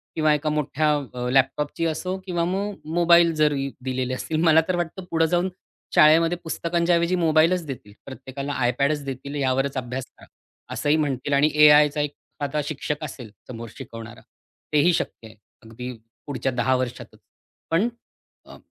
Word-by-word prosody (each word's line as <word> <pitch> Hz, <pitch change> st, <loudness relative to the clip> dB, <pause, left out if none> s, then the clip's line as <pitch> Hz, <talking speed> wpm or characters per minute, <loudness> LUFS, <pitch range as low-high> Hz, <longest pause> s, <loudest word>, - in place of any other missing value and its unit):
किंवा 155 Hz, -2 st, +3 dB
एका 150 Hz, +1 st, -1 dB
मोठ्या 150 Hz, 0 st, 0 dB, 0.2 s
अ, 125 Hz, 0 st, -3 dB
लॅपटॉपची 135 Hz, +5 st, +1 dB
असो 180 Hz, +4 st, -2 dB
किंवा 175 Hz, -3 st, -1 dB
मग 195 Hz, +3 st, -2 dB, 0.2 s
मोबाईल 170 Hz, -1 st, +5 dB
जरी 145 Hz, -3 st, +1 dB
दिलेले 130 Hz, -1 st, -2 dB
असतील. 155 Hz, +4 st, -3 dB
मला 160 Hz, -1 st, +6 dB
तर 185 Hz, -, 0 dB
वाटतं 175 Hz, +2 st, -3 dB
पुढे 165 Hz, 0 st, +3 dB
जाऊन 175 Hz, +3 st, +1 dB, 0.5 s
शाळेमध्ये 165 Hz, +3 st, +5 dB
पुस्तकांच्याऐवजी 170 Hz, +1 st, +1 dB
मोबाईलच 165 Hz, +1 st, +3 dB
देतील. 125 Hz, -8 st, -8 dB
प्रत्येकाला 135 Hz, +1 st, -6 dB
iPadच 140 Hz, +4 st, 0 dB
देतील 135 Hz, +1 st, -6 dB
यावरच 135 Hz, 0 st, 0 dB
अभ्यास 130 Hz, +1 st, -4 dB
करा. -, -, -16 dB, 0.5 s
असंही 145 Hz, +1 st, +1 dB
म्हणतील 145 Hz, -2 st, -1 dB
आणि 140 Hz, +2 st, +4 dB
एआयचा 150 Hz, 0 st, +6 dB
एखादा 145 Hz, 0 st, -4 dB
शिक्षक 150 Hz, +1 st, -4 dB
असेल 130 Hz, -6 st, -8 dB, 0.2 s
समोर 115 Hz, -2 st, -8 dB
शिकवणारा 115 Hz, 0 st, -9 dB, 0.5 s
तेही 150 Hz, +4 st, +4 dB
शक्य 115 Hz, -, -3 dB
आहे. 110 Hz, -, -16 dB, 0.3 s
अगदी 120 Hz, +3 st, -7 dB, 0.4 s
पुढच्या 140 Hz, -2 st, -2 dB
10 130 Hz, +2 st, +2 dB
वर्षातच. 125 Hz, -1 st, -5 dB, 0.5 s
पण 175 Hz, +8 st, +3 dB, 0.6 s
अ, -, -, -13 dB
150 Hz, 145 wpm, -24 LUFS, 130-165 Hz, 0.6 s, मला